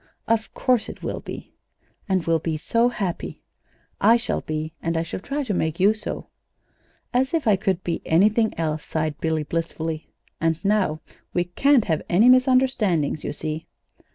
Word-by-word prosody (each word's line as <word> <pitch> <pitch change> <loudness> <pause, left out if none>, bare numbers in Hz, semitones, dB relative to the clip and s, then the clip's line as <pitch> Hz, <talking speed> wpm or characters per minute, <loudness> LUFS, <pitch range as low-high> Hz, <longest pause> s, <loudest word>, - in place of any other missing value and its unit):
"Of 225 -1 +1
course 250 -4 +1
it - - -10
will - - -3
be." - - -9 0.6
"And 185 -3 +1
we'll 165 -1 +2
be 160 0 -2
so 230 +9 +2
happy!" 195 -8 -4 0.6
"I 225 +4 +6
shall 235 - -2
be, 155 0 -4
and 165 0 -1
I 165 - +1
shall 165 - -5
try 280 +9 -3
to 225 -6 -2
make 160 -3 -1
you 200 +3 +5
so." 220 - -5 0.9
"As 260 +5 +2
if 315 -7 -1
I 210 - +6
could 190 -2 -1
be 170 - -2
anything 215 +6 +3
else," 155 -2 -1
sighed 155 -1 -3
Billy, 160 -1 0
blissfully. 160 0 -3 0.3
"And 165 -1 +1
now 195 -7 +1 0.3
we 175 - +3
can't 245 +8 +3
have 160 -5 0
any 210 +8 +5
misunderstandings, 255 - +3
you - - -2
see." 155 +1 -5
180 Hz, 170 wpm, -24 LUFS, 160-230 Hz, 0.9 s, I